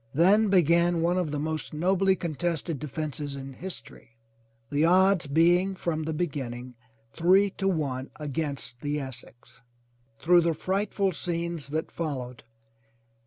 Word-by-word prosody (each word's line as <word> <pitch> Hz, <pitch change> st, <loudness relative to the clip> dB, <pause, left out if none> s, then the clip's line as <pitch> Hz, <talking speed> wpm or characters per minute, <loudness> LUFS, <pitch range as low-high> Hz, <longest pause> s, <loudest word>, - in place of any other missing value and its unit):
Then 200 Hz, +7 st, +5 dB
began 170 Hz, -2 st, +3 dB
one 175 Hz, +2 st, +2 dB
of 175 Hz, -4 st, -1 dB
the 150 Hz, -, -3 dB
most 155 Hz, +1 st, -3 dB
nobly 190 Hz, +4 st, +2 dB
contested 165 Hz, -2 st, -2 dB
defences 150 Hz, -1 st, -4 dB
in 135 Hz, 0 st, -7 dB
history, 130 Hz, -8 st, -9 dB, 0.5 s
the 145 Hz, +1 st, +2 dB
odds 185 Hz, 0 st, +4 dB
be 165 Hz, +5 st, +4 dB
ing 190 Hz, +1 st, -3 dB
from 170 Hz, -3 st, -2 dB
the 160 Hz, +1 st, -3 dB
beginning 130 Hz, -7 st, -4 dB, 0.4 s
three 190 Hz, +4 st, +4 dB
to 195 Hz, -, +1 dB
one 140 Hz, -7 st, -1 dB
against 140 Hz, -4 st, -4 dB
the 145 Hz, 0 st, -1 dB
Essex. 130 Hz, -3 st, -10 dB, 0.6 s
Through 175 Hz, +3 st, +5 dB
the 165 Hz, -1 st, +1 dB
frightful 195 Hz, +2 st, 0 dB
scenes 170 Hz, -2 st, -3 dB
that 155 Hz, +3 st, -3 dB
followed. 130 Hz, -7 st, -4 dB
160 Hz, 135 wpm, -27 LUFS, 145-180 Hz, 0.6 s, Then